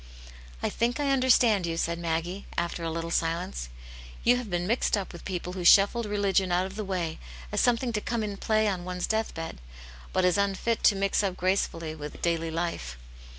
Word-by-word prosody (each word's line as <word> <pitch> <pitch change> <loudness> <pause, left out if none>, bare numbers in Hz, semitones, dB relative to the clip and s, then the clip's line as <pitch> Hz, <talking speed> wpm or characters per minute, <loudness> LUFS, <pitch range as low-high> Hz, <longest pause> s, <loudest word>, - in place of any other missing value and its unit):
"I - - +1
think 240 +4 0
I 285 -1 +1
understand 240 -7 +4
you," 165 0 -2
said 170 0 -1
Maggie, 170 +3 -2
after 170 0 -2
a 165 - -1
little 165 +1 -4
silence. 165 - -1 0.5
"You 245 - +5
have 245 -4 -5
been 175 -1 -1
mixed 225 +1 +1
up 195 -2 -5
with 170 - -10
people 180 -1 -4
who 185 -1 -4
shuffled 205 +6 +6
religion 200 -2 +1
out 180 +1 +2
of 190 +1 -7
the 215 - -3
way, 180 -5 -3 0.3
as - - +1
some 245 -1 +4
thing 240 0 -3
to 210 - -1
come 235 0 -2
in 205 -1 -4
play 215 +1 +2
on 185 -3 -1
one's 180 0 -3
death 220 0 -1
bed, 165 - -6 0.5
but 185 - +2
as 180 +2 +3
unfit 200 +3 0
to 205 - +6
mix 195 +1 +1
up 195 -3 -2
gracefully 170 -3 0
with 150 -1 -8
daily 165 -1 0
life. 160 - -3
185 Hz, 205 wpm, -28 LUFS, 170-210 Hz, 0.5 s, shuffled